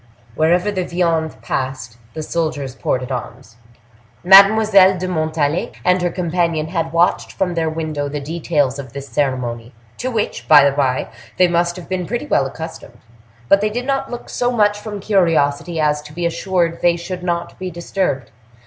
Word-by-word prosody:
Wherever 175 Hz, -, +2 dB
the 190 Hz, -2 st, -2 dB
viande 170 Hz, -3 st, -1 dB
passed, 130 Hz, -4 st, -4 dB, 0.2 s
the 155 Hz, -, -4 dB
soldiers 150 Hz, -5 st, -2 dB
ported 130 Hz, 0 st, -2 dB
arms. 125 Hz, -1 st, -7 dB, 0.7 s
Mademoiselle 195 Hz, 0 st, +7 dB
de 185 Hz, +1 st, -3 dB
Montalais 155 Hz, -2 st, -1 dB
and 180 Hz, 0 st, +3 dB
her 175 Hz, -, +1 dB
companion 170 Hz, -2 st, -1 dB
had 165 Hz, -2 st, -2 dB
watched 170 Hz, +2 st, +1 dB
from 180 Hz, -2 st, -1 dB
their 165 Hz, -1 st, 0 dB
window 155 Hz, -3 st, -3 dB
the 145 Hz, +1 st, -4 dB
details 145 Hz, -3 st, -1 dB
of 130 Hz, -4 st, -9 dB
this 140 Hz, 0 st, -7 dB
ceremony, 125 Hz, -5 st, -2 dB, 0.2 s
to 255 Hz, -, -2 dB
which, 225 Hz, -4 st, -3 dB
by 145 Hz, -2 st, +8 dB
the 140 Hz, -, 0 dB
bye, 130 Hz, -3 st, 0 dB, 0.3 s
they 180 Hz, -, +5 dB
must 175 Hz, 0 st, 0 dB
have 180 Hz, -2 st, -10 dB
been 185 Hz, -2 st, -3 dB
pretty 240 Hz, +5 st, -3 dB
well 140 Hz, -, +1 dB
accustomed. 135 Hz, -5 st, -9 dB, 0.5 s
But 195 Hz, +7 st, +5 dB
they 215 Hz, -, +1 dB
did 245 Hz, +4 st, -4 dB
not 275 Hz, 0 st, -1 dB
look 240 Hz, -, -7 dB
so 245 Hz, -, -1 dB
much 205 Hz, -3 st, +2 dB
from 210 Hz, -2 st, -7 dB
curiosity 165 Hz, -5 st, +1 dB
as 150 Hz, -1 st, +1 dB
to 150 Hz, 0 st, -13 dB
be 175 Hz, +2 st, -3 dB
assured 170 Hz, -1 st, -1 dB
they 175 Hz, -1 st, +3 dB
should 180 Hz, +1 st, -6 dB
not 170 Hz, -1 st, -3 dB
be 185 Hz, 0 st, -4 dB
disturbed. 170 Hz, -, -3 dB
170 Hz, 175 wpm, -19 LUFS, 145-185 Hz, 0.7 s, by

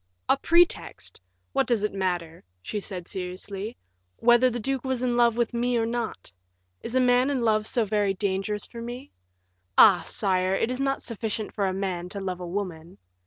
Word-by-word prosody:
"A -, -, +5 dB
pretext! 340 Hz, -, +1 dB, 0.3 s
What -, -, +2 dB
does 230 Hz, -4 st, +1 dB
it 210 Hz, -, -1 dB
matter," 175 Hz, -4 st, -2 dB, 0.2 s
she 210 Hz, -, -3 dB
said, 185 Hz, -3 st, -6 dB
seriously, 195 Hz, +3 st, -5 dB, 0.4 s
"whether 240 Hz, +2 st, +5 dB
the 240 Hz, 0 st, -3 dB
duke 265 Hz, +3 st, -2 dB
was 260 Hz, -2 st, -2 dB
in 245 Hz, -1 st, +1 dB
love 235 Hz, -1 st, +3 dB
with 235 Hz, 0 st, 0 dB
me 240 Hz, +1 st, +1 dB
or 225 Hz, -, +1 dB
not? 225 Hz, -, -4 dB, 0.5 s
Is 235 Hz, -, -6 dB
a -, -, +5 dB
man 250 Hz, +1 st, +4 dB
in 275 Hz, -3 st, 0 dB
love 215 Hz, -2 st, +2 dB
so 235 Hz, -3 st, +1 dB
very 205 Hz, -1 st, +1 dB
dangerous 200 Hz, +1 st, -2 dB
for 235 Hz, -, -9 dB
me? 245 Hz, +4 st, -7 dB, 0.7 s
Ah! 195 Hz, -4 st, +8 dB
sire, 185 Hz, -2 st, 0 dB
it 230 Hz, -, 0 dB
is 255 Hz, -, -4 dB
not 275 Hz, 0 st, 0 dB
sufficient 220 Hz, -2 st, -4 dB
for 200 Hz, -2 st, 0 dB
a -, -, 0 dB
man 185 Hz, -2 st, -3 dB
to 200 Hz, -, -5 dB
love 185 Hz, -2 st, -4 dB
a 180 Hz, -, -6 dB
woman." 175 Hz, -3 st, -5 dB
215 Hz, 190 wpm, -26 LUFS, 190-240 Hz, 0.7 s, Ah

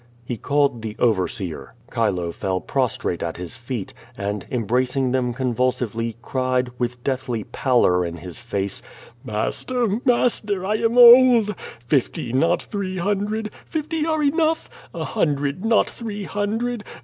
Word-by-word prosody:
He 120 Hz, -, -3 dB
called 140 Hz, 0 st, +1 dB
the 110 Hz, -1 st, -5 dB
overseer. 95 Hz, -4 st, -1 dB, 0.2 s
Chile 95 Hz, -8 st, 0 dB
fell 95 Hz, +2 st, -2 dB
prostrate 125 Hz, -7 st, -1 dB
at 85 Hz, -1 st, -3 dB
his 90 Hz, -1 st, -7 dB
feet, 120 Hz, -4 st, -5 dB, 0.2 s
and, 100 Hz, 0 st, -3 dB
embracing 125 Hz, +3 st, 0 dB
them 125 Hz, -1 st, +1 dB
convulsively, 120 Hz, -2 st, -1 dB
cried, 130 Hz, -1 st, 0 dB
with 120 Hz, 0 st, -2 dB
deathly 130 Hz, -4 st, -2 dB
pallor 120 Hz, -7 st, +2 dB
in 85 Hz, 0 st, -4 dB
his 90 Hz, 0 st, -8 dB
face: 100 Hz, -4 st, -3 dB, 0.4 s
Master, 220 Hz, -, -1 dB
master! 215 Hz, -6 st, +1 dB
I 210 Hz, +2 st, +1 dB
am 230 Hz, +2 st, +1 dB
old. 240 Hz, -3 st, +8 dB, 0.3 s
Fifty, 125 Hz, -2 st, 0 dB
not 165 Hz, +6 st, +2 dB
three 190 Hz, -2 st, -4 dB
hundred! 205 Hz, +3 st, -1 dB, 0.2 s
Fifty 315 Hz, 0 st, -2 dB
are 315 Hz, -1 st, 0 dB
enough. 320 Hz, +2 st, +1 dB, 0.2 s
A -, -, -4 dB
hundred, 145 Hz, +2 st, -1 dB
not 225 Hz, -1 st, +3 dB
three 210 Hz, -3 st, -6 dB
hundred! 210 Hz, +5 st, -2 dB
130 Hz, 135 wpm, -22 LUFS, -, 0.4 s, old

